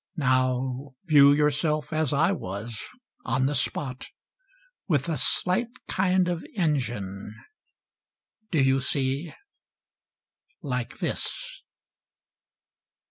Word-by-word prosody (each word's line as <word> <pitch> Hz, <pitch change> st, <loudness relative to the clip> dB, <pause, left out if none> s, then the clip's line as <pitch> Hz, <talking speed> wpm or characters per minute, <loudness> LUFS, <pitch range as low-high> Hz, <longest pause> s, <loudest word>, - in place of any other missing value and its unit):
Now 130 Hz, 0 st, 0 dB
view 145 Hz, -4 st, +7 dB
yourself 150 Hz, +2 st, +1 dB
as 155 Hz, -3 st, +1 dB
I 160 Hz, +5 st, +3 dB
was, 105 Hz, -, -5 dB, 0.4 s
on 130 Hz, +2 st, +1 dB
the 140 Hz, -, +1 dB
spot 130 Hz, -1 st, -3 dB, 0.4 s
— -, -, -36 dB
With 145 Hz, -3 st, +1 dB
a 165 Hz, -, 0 dB
slight 185 Hz, +9 st, +2 dB, 0.2 s
kind 185 Hz, -1 st, +2 dB
of 175 Hz, -2 st, -2 dB
engine. 115 Hz, -, -2 dB, 1.1 s
Do 155 Hz, -5 st, +2 dB
you 135 Hz, 0 st, +3 dB
see? 135 Hz, +4 st, -1 dB, 1.3 s
Like 125 Hz, -3 st, -3 dB
this -, -, -3 dB
140 Hz, 95 wpm, -26 LUFS, 130-165 Hz, 1.3 s, view